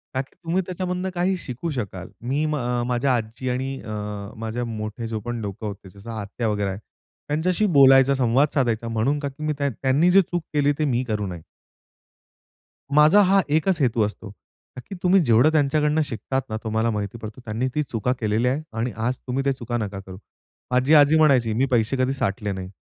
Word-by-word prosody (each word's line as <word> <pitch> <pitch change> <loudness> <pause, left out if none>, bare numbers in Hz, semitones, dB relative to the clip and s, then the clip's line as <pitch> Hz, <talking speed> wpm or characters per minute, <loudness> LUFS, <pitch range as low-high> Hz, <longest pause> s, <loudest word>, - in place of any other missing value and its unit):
का 130 - +1
की 135 - -15
तुम्ही 170 +3 0
त्याच्यामधनं 180 0 -3
काही 180 +2 +1
शिकू 140 +2 -5
शकाल. 95 - -5
मी 135 +6 -1
अ, 125 -5 -1
माझ्या 125 +2 +1
आजी 115 +3 -4
आणि 130 +2 -3
अ, 110 - -8 0.5
माझे 115 +2 -3
मोठे 110 0 -5
जो 110 -1 -3
पण 120 -1 -3
लोकं 100 +1 -6
होते. 100 -1 -8
जसं 100 +5 -11
आत्या 110 +2 -4
वगैरे 105 -1 -1
आहे. 95 +1 -5 0.5
त्यांच्याशी 170 +7 +1
बोलायचा, 135 0 +7
संवाद 130 +3 +3
साधायचा 120 -4 0
म्हणून, 115 +6 0
का 145 - -3
की 140 +3 -10
मी 155 0 0
त्यांनी 140 +5 +2
जे 195 - +7
चूक 175 -1 -4
केली, 145 -1 +3
ते 155 - +2
मी 125 -2 0
करू 105 -2 -1
नये. 90 -3 -7 1.6
माझा 155 +7 +7
हा 195 +1 +4
एकच 160 +4 +2
हेतू 120 -3 +2
असतो. 105 0 -7 0.5
का 125 - -7
की 195 - -5
तुम्ही 185 +2 +5
जेवढं 120 +6 +5
त्यांच्याकडनं 150 +1 +2
शिकतात 130 +2 -3
ना, 110 - -2
तुम्हाला 110 +1 0
माहिती 105 +1 -4
पडतो 110 +2 -9
"त्यांनी 115 +3 -2
ती 150 - +1
चुका 125 -2 -1
केलेल्या 110 +3 +1
आहेत 145 +4 -3
आणि 120 +2 -1 0.2
आज 125 0 -1
तुम्ही 130 +2 -1
त्या 140 0 +1
चुका 120 -1 -4
नका 100 -3 -4
करू." 95 -1 -9 0.5
माझी 125 +4 +3
आजी 150 +1 +6
म्हणायची 130 -8 +4
मी 125 +5 +2
पैसे 120 +2 +2
कधी 130 +1 +1
साठले 105 -5 -2
नाही. 95 -1 -6
125 Hz, 195 wpm, -23 LUFS, 110-150 Hz, 1.6 s, बोलायचा